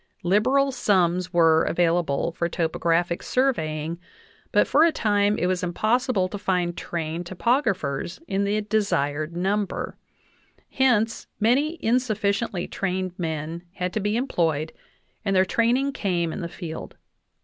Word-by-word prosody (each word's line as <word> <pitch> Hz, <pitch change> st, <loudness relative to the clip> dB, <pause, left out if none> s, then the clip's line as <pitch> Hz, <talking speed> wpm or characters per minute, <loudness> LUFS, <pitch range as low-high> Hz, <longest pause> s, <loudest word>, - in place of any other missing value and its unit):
Liberal 255 Hz, +10 st, +3 dB
sums 185 Hz, -7 st, +1 dB
were, 165 Hz, -2 st, +5 dB
available 170 Hz, -3 st, +1 dB
for 170 Hz, +1 st, -2 dB
topographic 170 Hz, +1 st, 0 dB
sur 265 Hz, +1 st, +2 dB
veying, 155 Hz, -1 st, -4 dB, 0.5 s
but -, -, +4 dB
for 300 Hz, -, +4 dB
a 335 Hz, -, +5 dB
time 205 Hz, -4 st, +1 dB
it -, -, 0 dB
was 185 Hz, 0 st, 0 dB
impossible 215 Hz, +3 st, +1 dB
to 205 Hz, -, -6 dB
find 180 Hz, -3 st, 0 dB
trained 165 Hz, 0 st, -4 dB
topog 235 Hz, +10 st, +1 dB
raphers 170 Hz, -, -2 dB
in 195 Hz, +1 st, 0 dB
the 205 Hz, +2 st, 0 dB
desired 170 Hz, -7 st, -1 dB
number; 195 Hz, +2 st, -1 dB, 0.8 s
hence 235 Hz, -4 st, +1 dB
many 270 Hz, +9 st, +2 dB
insufficiently 215 Hz, -5 st, 0 dB
trained 185 Hz, -1 st, -2 dB
men 160 Hz, 0 st, -3 dB
had 180 Hz, -1 st, -3 dB
to -, -, 0 dB
be 210 Hz, +2 st, 0 dB
employed 165 Hz, -, 0 dB, 0.5 s
and 195 Hz, -2 st, 0 dB
their 185 Hz, 0 st, +5 dB
training 245 Hz, +7 st, +1 dB
came 175 Hz, -8 st, -1 dB
in -, -, -5 dB
the 170 Hz, -, -4 dB
field. 165 Hz, -2 st, -7 dB
185 Hz, 140 wpm, -24 LUFS, 170-220 Hz, 0.8 s, were